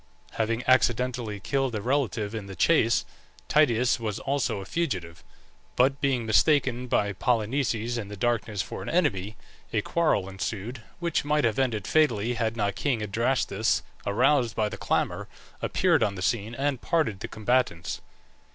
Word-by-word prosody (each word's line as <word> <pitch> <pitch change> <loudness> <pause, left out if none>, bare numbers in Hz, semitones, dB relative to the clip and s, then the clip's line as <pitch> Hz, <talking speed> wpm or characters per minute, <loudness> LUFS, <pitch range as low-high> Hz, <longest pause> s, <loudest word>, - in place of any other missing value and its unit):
Having 115 +2 -1
accidentally 125 -3 +2
killed 135 +2 -1
a - - -1
relative 120 -5 0
in 110 -3 -5
the 95 - -8
chase, 115 - +3 0.4
Tydeus 125 -5 +3
was 110 -3 -3
also 135 -6 -1
a 95 - -7
fugitive; 90 - -3 0.5
but 135 +3 +2
being 130 -5 +1
mistaken 125 +1 +3
by 100 -4 +1
Polynices 115 +1 0
in 105 - -5
the 105 0 -8
darkness 110 -2 0
for - - -7
an - - -5
enemy, 110 - 0 0.4
a 110 - +1
quarrel 155 - +1
ensued, 100 +5 -5 0.2
which 170 -1 -1
might 150 0 +1
have 115 0 +1
ended 115 -7 0
fatally, 120 -7 +2
had 115 -1 -1
not 100 -2 0
king 110 +4 -1
Adrastus, 110 0 0 0.2
aroused 120 +2 +2
by 105 -1 +1
the - - -6
clamour, - - -1 0.3
appeared - - +2
on 105 -3 +1
the 90 - -5
scene 110 +2 -1
and 135 -1 -1
parted 155 - 0
the - - -5
combatants. 110 -7 -1
115 Hz, 155 wpm, -27 LUFS, 105-130 Hz, 0.5 s, chase